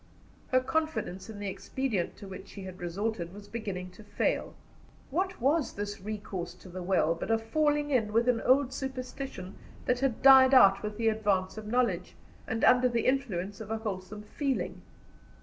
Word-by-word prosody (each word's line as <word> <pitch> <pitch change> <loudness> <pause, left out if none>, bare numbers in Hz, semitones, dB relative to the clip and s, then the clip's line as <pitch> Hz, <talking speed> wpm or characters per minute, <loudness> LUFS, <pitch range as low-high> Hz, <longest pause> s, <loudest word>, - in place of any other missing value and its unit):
Her 255 0 +3
confidence 260 - -2
in 220 - -8
the 205 0 -4
expedient 210 -1 -2
to 200 - -10
which 190 +1 -9
she 195 - -9
had 185 0 -8
resorted 175 0 -3
was 205 0 -11
beginning 190 -5 -5
to 215 - -14
fail. 205 0 -1 0.6
What 375 +5 -1
was 275 +1 +1
this 205 0 -5
recourse 190 -4 -5
to 185 - -14
the 185 +1 -6
well 175 -3 +2
but 170 - -6
a 225 - +4
falling 295 +5 +1
in 225 -6 +2
with 230 +3 +2
an 245 -2 +2
old 265 0 +3
superstition 265 -7 -6 0.3
that 250 0 +1
had 265 -3 -1
died 265 0 +8
out 195 -5 +7
with 210 0 -5
the 225 -1 +2
advance 200 -4 0
of 215 -1 -7
knowledge, 245 +2 0 0.3
and 225 0 -2
under 250 0 +6
the 235 -1 0
influence 205 -7 -1
of 215 - -8
a 225 - -1
wholesome 210 -1 -5
feeling? 270 +4 -2
220 Hz, 180 wpm, -30 LUFS, 195-255 Hz, 0.6 s, died